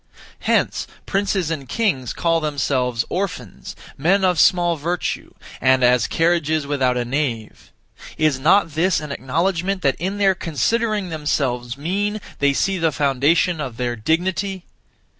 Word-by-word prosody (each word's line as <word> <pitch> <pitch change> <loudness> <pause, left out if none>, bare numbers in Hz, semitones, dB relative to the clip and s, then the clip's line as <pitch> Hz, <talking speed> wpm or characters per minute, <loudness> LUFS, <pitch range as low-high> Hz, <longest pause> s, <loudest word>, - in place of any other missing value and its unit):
Hence - - 0 0.2
princes 195 -4 0
and 140 -5 -5
kings 165 - 0
call 165 -1 +1
themselves 130 -5 -1
'Orphans,' 175 - -5 0.2
'Men 190 +6 +3
of 180 -4 +2
small 175 -2 +4
virtue,' 170 +4 -3 0.3
and 130 -1 +4
as 125 -2 +4
'Carriages 165 -2 +1
without 135 -3 +1
a 120 - -1
nave.' 120 -4 -3 0.5
Is 155 -4 +2
not 165 +4 +3
this 165 +4 +1
an 150 -1 -7
acknowledgment 175 +8 -1
that 135 -2 +2
in 190 +3 -2
their 195 -2 +4
considering 210 +5 -1
themselves 135 -6 -2
mean 200 +8 -1 0.2
they 140 0 +3
see 190 +7 0
the 165 -1 +2
foundation 145 +4 +2
of 125 -5 -5
their 120 -1 -2
dignity? 180 - -1
160 Hz, 140 wpm, -21 LUFS, 135-185 Hz, 0.5 s, small